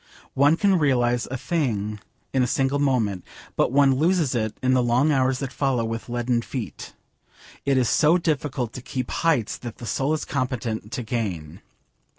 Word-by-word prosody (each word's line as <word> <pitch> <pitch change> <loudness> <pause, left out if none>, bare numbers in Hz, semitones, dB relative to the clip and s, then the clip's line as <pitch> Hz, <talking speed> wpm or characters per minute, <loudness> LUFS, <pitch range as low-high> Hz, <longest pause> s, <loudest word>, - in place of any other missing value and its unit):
One 145 +4 +4
can 195 -2 +3
realise 120 -5 +2
a 130 - -3
thing 110 -10 -2 0.3
in 130 - +2
a 125 - +2
single 135 +3 +1
moment, 115 -10 +1 0.3
but - - +2
one 140 0 +5
loses 160 +1 +2
it 110 -3 -2
in 130 0 +3
the 130 - +4
long 125 +5 +2
hours 130 -2 +2
that 135 0 -5
follow 130 -5 0
with 115 +1 -5
leaden 120 0 0
feet. 120 -4 -7 0.7
It 135 -1 +3
is 125 -2 +3
so 160 +8 +4
difficult 145 -8 -2
to 125 - -7
keep 130 0 -4
'heights 150 -10 0
that 120 -2 -8
the 120 - -8
soul 135 +6 0
is 155 - -4
competent 120 -5 -3
to 125 - -3
gain.' 95 - -4
130 Hz, 175 wpm, -24 LUFS, 115-140 Hz, 0.7 s, one